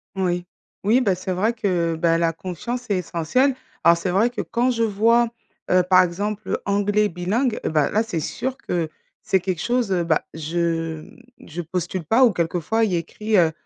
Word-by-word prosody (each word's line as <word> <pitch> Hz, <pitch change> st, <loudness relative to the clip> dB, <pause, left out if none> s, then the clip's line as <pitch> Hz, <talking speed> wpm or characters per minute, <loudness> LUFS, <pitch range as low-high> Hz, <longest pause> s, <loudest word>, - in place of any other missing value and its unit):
Oui. 180 Hz, -2 st, -1 dB, 0.4 s
Oui, 225 Hz, +6 st, +4 dB
bah, 195 Hz, -7 st, +2 dB
c'est 185 Hz, +1 st, -5 dB
vrai 215 Hz, +6 st, +1 dB
que, 180 Hz, -7 st, 0 dB
heu, -, -, -7 dB
bah, 165 Hz, 0 st, +2 dB
la 165 Hz, 0 st, +1 dB
confiance 215 Hz, +9 st, -5 dB
est 200 Hz, -, +2 dB
essentielle. 180 Hz, -, +1 dB, 0.3 s
Alors 170 Hz, +1 st, +6 dB
c'est 180 Hz, +2 st, -2 dB
vrai 205 Hz, +6 st, +3 dB
que 245 Hz, -, -4 dB
quand 250 Hz, +2 st, 0 dB
je 230 Hz, -1 st, 0 dB
vois, 230 Hz, +3 st, +3 dB, 0.4 s
heu, 185 Hz, 0 st, +5 dB
par 185 Hz, -1 st, +7 dB
exemple, 205 Hz, +4 st, -3 dB
heu, -, -, +1 dB
anglais 205 Hz, +1 st, +2 dB
bilingue, 215 Hz, +8 st, -1 dB
heu, -, -, +1 dB
bah, 150 Hz, -2 st, +2 dB
là 215 Hz, +2 st, +2 dB
c'est 215 Hz, -7 st, -3 dB
sûr 260 Hz, -, -3 dB
que 170 Hz, -9 st, -2 dB, 0.3 s
c'est 190 Hz, -, +2 dB
quelque 180 Hz, -2 st, -2 dB
chose, 240 Hz, -2 st, 0 dB
heu, 175 Hz, -2 st, +1 dB
bah, 160 Hz, -2 st, +1 dB
je 165 Hz, 0 st, -2 dB
m -, -, -16 dB, 0.3 s
je 170 Hz, +3 st, -5 dB
postule 175 Hz, +1 st, -4 dB
pas. 225 Hz, -, +4 dB
Ou 240 Hz, -, +6 dB
quelquefois, 175 Hz, +5 st, 0 dB
il 195 Hz, -, -2 dB
y -, -, +3 dB
a 170 Hz, -, +2 dB
écrit, 210 Hz, +6 st, -3 dB
heu, 165 Hz, -3 st, +4 dB
185 Hz, 210 wpm, -22 LUFS, 170-220 Hz, 0.4 s, par